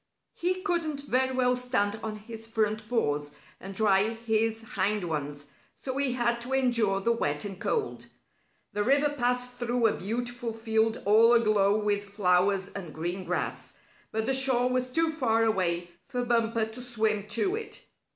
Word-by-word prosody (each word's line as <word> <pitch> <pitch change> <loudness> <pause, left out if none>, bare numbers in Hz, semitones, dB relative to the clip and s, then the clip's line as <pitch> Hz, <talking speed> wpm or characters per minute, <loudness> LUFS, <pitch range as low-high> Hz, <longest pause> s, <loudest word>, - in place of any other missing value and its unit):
He 370 +1 -2
couldn't 330 -7 -1
very 260 -1 +1
well 250 -1 +2
stand 225 -4 -1
on 220 -1 -4
his 225 +1 -7
front 215 -1 -1
paws, 145 -10 -1 0.2
and 195 +1 -8
dry 205 0 +3
his 225 0 0
hind 205 -2 -1
ones, 145 -3 -4 0.3
so 260 -1 -5
he 275 -3 +2
had 235 -1 0
to 250 +3 -5
endure 235 -7 +2
the 235 - +2
wet 145 -10 -1
and 195 -1 -7
cold. 435 -3 -2 0.7
The 205 0 0
river 280 +5 +3
passed 250 -1 0
through 240 -1 -1
a 220 - +3
beautiful 240 +3 -4
field 225 0 0
all 225 +3 +6
aglow 215 -3 +3
with 205 -1 0
flowers 195 0 +2
and 180 -6 -7
green 175 +4 -4
grass, - - -3 0.4
but 220 0 -1
the 265 - +2
shore 260 -2 +4
was 255 0 0
too 325 +5 +1
far 230 -8 +1
away 175 -5 0 0.2
for 245 0 -2
Bumper 230 -1 +1
to 220 +3 -8
swim 220 -4 -1
to 235 - 0
it. 440 -1 -7
225 Hz, 165 wpm, -28 LUFS, 205-250 Hz, 0.7 s, all